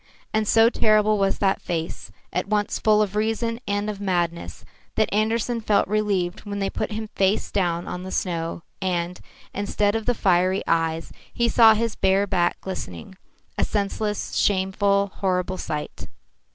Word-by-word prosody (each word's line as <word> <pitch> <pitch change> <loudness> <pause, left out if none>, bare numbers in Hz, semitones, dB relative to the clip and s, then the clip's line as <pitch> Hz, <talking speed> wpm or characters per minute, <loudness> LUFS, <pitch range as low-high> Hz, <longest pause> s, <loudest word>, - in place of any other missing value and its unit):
And 215 -1 +1
so 225 +1 +6
terrible 215 -2 +3
was 195 0 +1
that 195 -1 +1
face, 165 -2 -4 0.2
at 180 +3 -1
once 210 0 0
full 215 -1 +4
of 205 -1 -5
reason 225 +2 0
and 205 +1 -1
of 205 -1 -4
madness, 175 -3 -2 0.3
that 220 - +1
Andersen 225 +2 0
felt 210 -2 +2
relieved 200 -4 0
when 205 -1 -6
they 195 -1 -1
put - - -3
him 215 0 -4
face 195 +1 0
downward 175 -3 0
on 180 - -5
the 185 - -7
snow 170 -3 -2 0.2
and, 180 -1 -1 0.3
instead 205 0 0
of 225 -1 -3
the 245 - +2
fiery 185 -1 +2
eyes, 165 0 0 0.2
he 235 - +1
saw 225 -1 +6
his 230 0 -1
bare 195 +1 +2
back 180 -3 0
glistening 185 - -7 0.4
a - - +3
senseless, 210 0 -2
shameful, 200 0 +2
horrible 185 -1 -1
sight. 150 -2 -5
200 Hz, 160 wpm, -24 LUFS, 180-215 Hz, 0.4 s, so